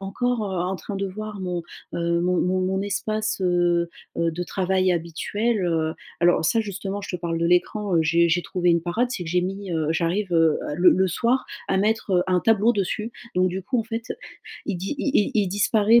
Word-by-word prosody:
encore, 230 +4 -1
heu, 190 -2 -3
en 185 +2 -1
train 195 +4 -6
de 195 0 -1
voir 210 +1 -6
mon, 180 -2 -3 0.3
heu, 170 0 0
mon 180 0 +1
mon 185 +1 +1
mon 190 +1 0
espace, 215 +1 -2
heu, 175 -1 +2 0.3
heu, 170 0 +2
de 175 +2 -3
travail 185 -1 +1
habituel, 190 +6 -1
heu. 160 -2 0 0.3
Alors 175 -1 +4
ça 225 +8 +3
justement 200 -1 -4
je 190 -2 -4
te - - -18
parle 165 -1 -2
de 170 - +1
l'écran, 180 +2 +1
heu, - - +5
j'ai 170 +2 +3
j'ai 175 +1 +2
trouvé 180 -2 +1
une 170 0 +3
parade 220 +9 0
c'est 180 -8 -4
que 160 - -5
j'ai 180 - +3
mis, 195 +1 -4
heu 160 -2 0
j'arrive, 175 +4 0
heu, 165 -2 +4 0.2
le 180 +2 +6
le 190 +1 +3
soir 235 +9 +1 0.2
à 190 - +2
mettre, 215 +1 +1
heu, 180 -1 +4
un 180 -1 +2
tableau 225 +2 +4
dessus. 215 +3 -2 0.2
Donc 185 0 +3
du 185 +1 -4
coup 245 +6 -1
en 225 - 0
fait, 230 0 -4 0.6
il 205 - -1
di 190 +11 -3
il 285 - 0
il 205 - +3
il 205 -3 +2
disparaît 210 +3 +4
185 Hz, 220 wpm, -24 LUFS, 175-210 Hz, 0.6 s, le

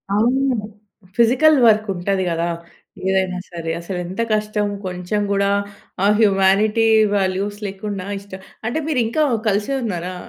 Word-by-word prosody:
అవును. 255 +4 +2 0.6
Physical 255 +7 +5
work 215 -1 +4
ఉంటది 190 +1 -1
కదా! 165 0 -1 0.6
ఏదైనా 190 -1 0
సరే. 165 -1 -4
అసలెంత 180 +2 -5
కష్టం 210 -1 0 0.2
కొంచెం 180 +3 -2
కూడా, 200 0 +2 0.6
ఆ - - +5
హ్యుమానిటి 205 +2 +3 0.3
వాల్యూస్ 195 +1 -1
లేకుండా 195 -1 -5
ఇష్టం 195 -1 -11 0.3
అంటే 240 +7 -1
మీరు 300 -5 0
ఇంకా 270 +8 +1 0.2
కలిసే 205 +5 0
ఉన్నారా? 180 -4 -4
200 Hz, 125 wpm, -20 LUFS, 185-220 Hz, 0.6 s, Physical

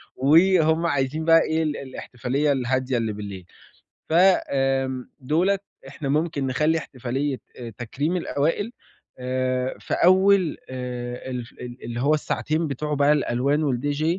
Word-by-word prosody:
وهُم 160 +3 +4
عايزين 145 +1 0
بقى 165 0 +6
إيه 160 +1 0
ال 150 -2 -2
الإحتفالية 130 +2 -2
الهادية 130 -1 0
اللي 115 -2 -1
بالليل، 100 -3 -7 0.6
ف - - -2
آمم، 135 -7 +2
دُولت 180 +9 +1 0.3
إحنا 140 0 -5
ممكن 150 -2 0
نخلّي 155 +5 +1
إحتفالية 135 -1 -3 0.2
آآ، 120 -2 -6
تكريم 145 +9 -2
الأوائل 165 +7 -1 0.5
آآ، 130 0 -1
في - - -5
أول 185 -2 +4
آآ، 125 0 -5
الف 125 -2 -5
ال 125 0 -10
اللي 120 0 -5
هو 145 +3 +3
الساعتين 155 +1 -1
بتوع 150 +2 -3
بقى 145 +1 +3
الألوان 140 +1 +1
والDJ 145 +2 -1
140 Hz, 135 wpm, -24 LUFS, 125-160 Hz, 0.6 s, بقى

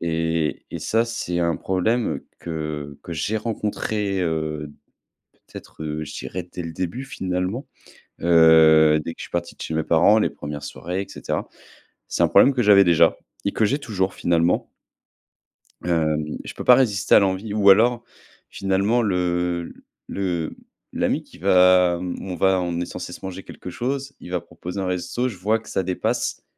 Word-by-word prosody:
Et 80 -1 -1
et - - -5
ça, 115 +1 +1
c'est 100 -7 -3
un 85 -1 +1
problème 110 +6 0 0.2
que 75 -3 -5
que 85 - -7
j'ai 100 +8 -1
rencontré, 105 -3 -2
heu, 75 -3 -2 0.8
peut-être, 80 - -10
heu, 75 0 -3
je - - -9
dirais 90 0 -6
dès 90 - -5
le 85 - -6
début, 95 +10 -4
finalement. 95 +1 -3 0.6
Heu, 80 -2 +6
dès 85 - -5
que - - -25
je - - -5
suis - - -9
parti 85 0 -3
de - - -12
chez 80 - -4
mes 80 - 0
parents, 95 +8 +4
les - - +1
1res 75 0 -7
soirées 90 +3 -4
et 100 - -8
cetera. - - -4 0.6
C'est - - 0
un - - +5
problème 140 - +6
que 120 - +2
j'avais 100 -1 +7
déjà 85 -1 +4 0.3
et 100 - +1
que 110 - 0
j'ai 140 +8 0
toujours 95 -8 -2
finalement. 85 0 +1 1.2
Hem, 75 -3 0
je - - -8
peux - - -7
pas 125 - +8
résister 110 -6 +2
à - - +9
l'envie 100 +2 0
ou 105 -1 +3
alors 115 +4 +5 0.5
finalement 100 +5 +1
le 90 -3 -1 0.3
le 90 -5 -3 0.4
l'ami - - 0
qui - - -18
va 90 -1 +5
on 90 +1 -5
va 95 +1 +2
on 85 -1 -2
est 90 - -2
censé - - -7
se - - -11
manger 95 0 -6
quelque - - -10
chose. 135 +7 -3
Il 90 - -10
va 90 - -1
proposer 85 +3 -7
un 95 - -2
resto, 90 +8 -2
je 105 - -7
vois 110 +5 +1
que 110 - -15
ça 95 - -1
dépasse, 90 0 -2
90 Hz, 180 wpm, -23 LUFS, 85-100 Hz, 1.2 s, à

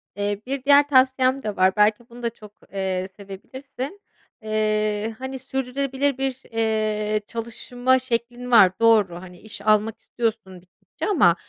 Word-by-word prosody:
Eee, 205 0 -2
bir 270 0 -4
diğer 285 +1 +6
tavsiyem 260 -1 +3
de 210 -2 -3
var, 185 0 +3
belki 210 +3 +2
bunu 240 +1 -12
da 235 - +1
çok, 215 -2 -15 0.2
eee, 190 -1 -2
sevebilirsin: 260 - -8 0.4
Eee, 215 0 0
hani, 265 0 -5
sürdürülebilir 265 +1 -2
bir, 265 -1 -3
eee, 215 -1 0
çalışma 245 +2 -1
şeklin 245 0 -3
var, 205 -6 +7
doğru, 220 -6 +4
hani, 180 -1 -12
iş 210 -2 -10
almak 215 +1 +2
istiyorsun 220 -6 -3
gittikçe 180 +1 -9
ama, 200 - +4
225 Hz, 140 wpm, -23 LUFS, 210-260 Hz, 0.4 s, var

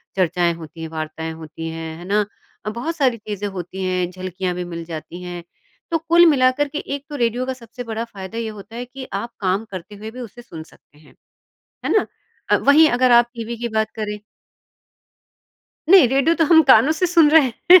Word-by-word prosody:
चर्चाएँ 175 -2 +1
होती 165 0 -10
हैं, 160 - -4
वार्ताएँ 160 0 -5
होती 160 +1 -7
हैं। 160 0 -6
है 175 - -10
ना? 205 +2 +1 0.4
अ, - - -1
बहुत 245 +10 -4
सारी 260 -6 +2
चीज़ें 205 -1 -5
होती 190 0 -6
हैं, 185 -1 0
झलकियाँ 185 0 -4
भी 180 - -3
मिल 170 - -5
जाती 165 +2 -8
हैं। 175 -1 -7 0.5
तो 330 - +3
कुल 335 +2 +5
मिलाकर 280 -2 +3
के 290 - -6 0.2
एक 285 - -9
तो 295 - -6
रेडियो 240 0 0
का 260 - -2
सबसे 245 0 -10
बड़ा 225 -1 -4
फ़ायदा 200 -1 -9
ये 230 -1 -2
होता 205 +3 -12
है 245 +1 -5
कि 260 +1 -9
आप 220 +5 -3
काम 195 +3 0
करते 190 +2 -8
हुए 215 +2 -8
भी 250 - -10
उसे 240 -1 -9
सुन 165 -9 -10
सकते 150 - -25
हैं। 150 -1 -20 0.7
है - - 0
ना? - - +2 0.5
अ, - - +7
वहीं 305 +3 +6
अगर 250 +1 +3
आप 240 0 +6
टीवी 230 0 -5
की 235 - -1
बात 220 0 -1
करें 210 -1 -3 1.7
नहीं, 365 -7 +8
रेडियो 275 +6 +3
तो 330 - +2
हम 320 0 +6
कानों 260 +5 +7
से 340 +3 0
सुन 330 -4 +5
रहे 305 -4 +6 0.2
हैं। 365 - +11
225 Hz, 210 wpm, -21 LUFS, 180-260 Hz, 1.7 s, हैं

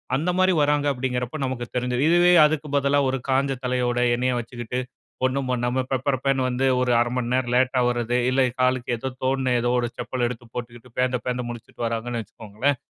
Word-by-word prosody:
அந்த 165 +6 0
மாதிரி 185 0 +4
வறாங்க 145 0 +2
அப்படிங்கிறப்ப 125 0 -3
நமக்கு 125 -2 -3
தெரிஞ்சிரும். 125 +1 0
இதுவே 175 +1 +5
அதுக்கு 150 0 -3
பதிலா 140 +1 +2
ஒரு 135 - 0
காஞ்ச 135 +1 +2
தலையோட 125 -1 0 0.2
எண்ணெய்ய 125 +1 0
வச்சுக்கிட்டு 120 +1 -5 0.5
ஒண்ணும் 130 +1 0
பண்ணாம 125 +1 0
பெப்பரபேன்னு 135 0 0
வந்து 125 +2 0
ஒரு 125 -1 +1
1/2 120 0 +1
மணி 125 -1 -2
நேரம் 125 -1 0
லேட்டா 130 0 +2
வரது. 120 0 0
இல்ல 135 +1 +2 0.2
காலுக்கு 125 -1 +1
ஏதோ 130 +3 -4
தோணுன 130 -1 +1
ஏதோ 120 - 0
ஒரு 120 - 0
செப்பல 120 0 -2
எடுத்து 120 0 -7
போட்டுக்கிட்டு 120 0 -8
பேந்த 125 0 +1
பேந்த 125 0 -1
முழிச்சுட்டு 120 0 -9
வராங்கன்னு 115 +1 -2
வச்சுக்கோங்களேன். 110 +6 -2
125 Hz, 175 wpm, -24 LUFS, 120-135 Hz, 0.5 s, இதுவே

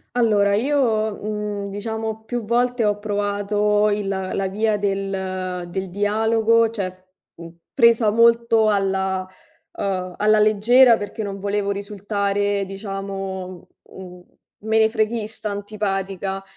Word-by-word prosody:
Allora 205 -4 +3
io, 220 -4 +1
mhmm, 210 -1 -4
diciamo, 220 +2 -4
più 240 0 -4
volte 245 +1 +1
ho 205 -1 +1
provato 205 0 0
il 205 -1 -1
la 190 0 -2
via 215 +2 0
del 190 -2 -3
del 190 +2 -4
dialogo, 220 +4 +2
cioè, 185 -4 -6 0.3
mhmm, 170 0 -10 0.2
presa 230 -2 +4
molto 230 0 +4
alla 190 -2 0 0.5
uhm, 185 -2 -2
alla 215 +1 +3
leggera 230 +4 +5
perché 205 +1 -6
non 200 -1 -5
volevo 200 0 -1
risultare, 200 0 -1
diciamo, 195 -2 -6 0.2
mhmm, 180 -1 -12 0.4
menefreghista, 220 0 0
antipatica. 195 -2 -3
205 Hz, 110 wpm, -21 LUFS, 195-220 Hz, 0.5 s, leggera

